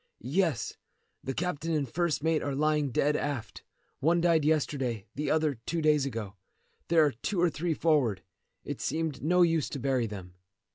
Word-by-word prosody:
"Yes; 170 Hz, -9 st, +1 dB, 0.5 s
the 135 Hz, -, -3 dB
captain 165 Hz, -2 st, -2 dB
and 145 Hz, -3 st, 0 dB
first 165 Hz, +2 st, -1 dB
mate 160 Hz, -1 st, +2 dB
are 140 Hz, -1 st, -2 dB
lying 150 Hz, 0 st, +1 dB
dead 145 Hz, +4 st, +1 dB
aft. 135 Hz, -8 st, -3 dB, 0.4 s
One 170 Hz, +4 st, +3 dB
died 165 Hz, -2 st, +3 dB
yesterday, 135 Hz, -8 st, 0 dB
the 150 Hz, +2 st, -2 dB
other 155 Hz, -6 st, +1 dB
two 170 Hz, -, -1 dB
days 150 Hz, -3 st, +3 dB
ago. 110 Hz, -5 st, -5 dB, 0.5 s
There 165 Hz, -2 st, +5 dB
are 145 Hz, -, +2 dB
two 175 Hz, -, -3 dB
or 175 Hz, -1 st, +3 dB
three 160 Hz, +1 st, -1 dB
forward. 130 Hz, -, +2 dB, 0.4 s
It -, -, -5 dB
seemed 160 Hz, -4 st, -2 dB
no 180 Hz, +4 st, +4 dB
use 165 Hz, -3 st, +2 dB
to 140 Hz, -, -5 dB
bury 130 Hz, -2 st, +1 dB
them." 95 Hz, -4 st, -8 dB
150 Hz, 175 wpm, -29 LUFS, 135-165 Hz, 0.5 s, There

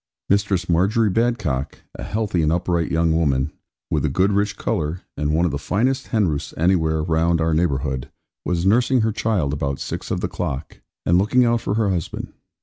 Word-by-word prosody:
Ed. 65 Hz, +9 st, -4 dB
Mistress 100 Hz, -3 st, 0 dB
Margery 100 Hz, +6 st, +2 dB
Badcock, 110 Hz, -, 0 dB, 0.2 s
a -, -, -9 dB
healthy 105 Hz, -5 st, -1 dB
and 80 Hz, 0 st, +2 dB
upright 85 Hz, -1 st, 0 dB
young 80 Hz, 0 st, +2 dB
woman, 70 Hz, -3 st, +1 dB, 0.4 s
with -, -, +1 dB
a 75 Hz, -, +1 dB
good 95 Hz, +8 st, +2 dB
rich 100 Hz, +1 st, 0 dB
colour, 75 Hz, +4 st, -2 dB
and 75 Hz, 0 st, -1 dB
one 80 Hz, +3 st, +2 dB
of 85 Hz, -, 0 dB
the 70 Hz, -, -3 dB
finest 130 Hz, -, 0 dB
hen 110 Hz, -5 st, +2 dB
roosts 75 Hz, -3 st, -3 dB
anywhere 80 Hz, -2 st, +2 dB
round 85 Hz, +1 st, +1 dB
our 80 Hz, 0 st, +1 dB
neighbourhood, 70 Hz, -5 st, -1 dB, 0.3 s
was 85 Hz, 0 st, -1 dB
nursing 125 Hz, +5 st, +3 dB
her 110 Hz, 0 st, +1 dB
child 100 Hz, -10 st, 0 dB
about 70 Hz, -2 st, -2 dB
six -, -, -5 dB
of -, -, -1 dB
the -, -, 0 dB
clock, 70 Hz, +3 st, -5 dB, 0.3 s
and 85 Hz, +1 st, +4 dB
looking 125 Hz, +6 st, +3 dB
out 120 Hz, 0 st, +2 dB
for 100 Hz, -, -1 dB
her 110 Hz, -3 st, +1 dB
husband. 85 Hz, -4 st, -4 dB
85 Hz, 195 wpm, -22 LUFS, 75-105 Hz, 0.4 s, and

